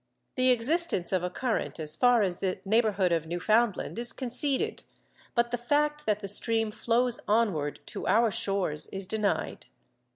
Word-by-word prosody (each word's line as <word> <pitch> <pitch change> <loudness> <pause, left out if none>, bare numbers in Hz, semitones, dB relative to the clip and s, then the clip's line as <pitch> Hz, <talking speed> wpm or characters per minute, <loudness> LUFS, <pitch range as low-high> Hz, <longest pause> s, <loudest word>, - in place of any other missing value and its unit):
The 255 0 +2
existence 255 - +1
of 185 -2 +1
a 180 - -2
current 235 0 -2
as 155 -1 -3
far 245 0 +4
as 180 -3 -1
the 185 -1 -2
neighbourhood 205 -3 +2
of 165 -1 0
Newfoundland 215 +6 0
is 240 0 -4
conceded, 265 +2 -1 0.5
but 235 0 +1
the 245 - -2
fact 295 +3 0
that 210 -1 +1
the 200 - -5
stream 225 +2 +1
flows 240 +2 0
onward 200 -10 0
to - - -5
our 230 0 +3
shores 195 -8 -1
is 195 0 -5
denied. 210 +1 -2
220 Hz, 160 wpm, -28 LUFS, 190-240 Hz, 0.5 s, far